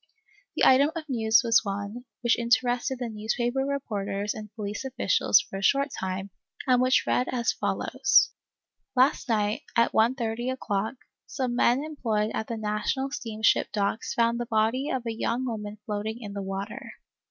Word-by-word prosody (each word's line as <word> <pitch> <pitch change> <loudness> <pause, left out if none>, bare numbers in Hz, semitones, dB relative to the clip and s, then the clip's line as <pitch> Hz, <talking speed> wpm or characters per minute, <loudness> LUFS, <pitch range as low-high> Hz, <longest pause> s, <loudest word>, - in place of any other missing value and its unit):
The - - +3
item 275 +3 +6
of 320 -1 -5
news 230 -2 +4
was 230 -1 +4
one, 205 +4 -5 0.2
which 235 -1 +3
inter 240 +1 +2
ested 250 +2 -1
the 245 -1 -3
newspaper 235 +4 -2
reporters 210 -7 -2
and 210 -1 -9
police 210 +1 -4
officials 250 -5 +3
for 195 - -6
a - - -6
short 275 +7 +3
time, 190 +1 -4 0.3
and 250 -2 +4
which 255 +1 +3
read 250 - +1
as 240 -2 +1
follows: 260 +6 +2 0.3
" - - -56
Last 260 0 +3
night, 210 -1 +1
at 235 0 +3
1 225 +3 +4
130 240 -1 -3
o'clock, 220 -3 -2 0.3
some 255 -3 -2
men 245 +3 +3
em 310 -1 -8
ployed 215 -2 +1
at 220 - -3
the 230 - -4
National 220 +6 -1
steamship 220 -6 +1
docks 205 +1 -1
found 235 0 +2
the 240 - -3
body 225 +5 +1
of 255 -2 -2
a 230 - -2
young 235 +3 -1
woman 210 -3 -5
floating 215 +1 -3
in 205 -4 -7
the 200 - -4
water. 195 +2 -5
230 Hz, 175 wpm, -27 LUFS, 210-255 Hz, 0.3 s, item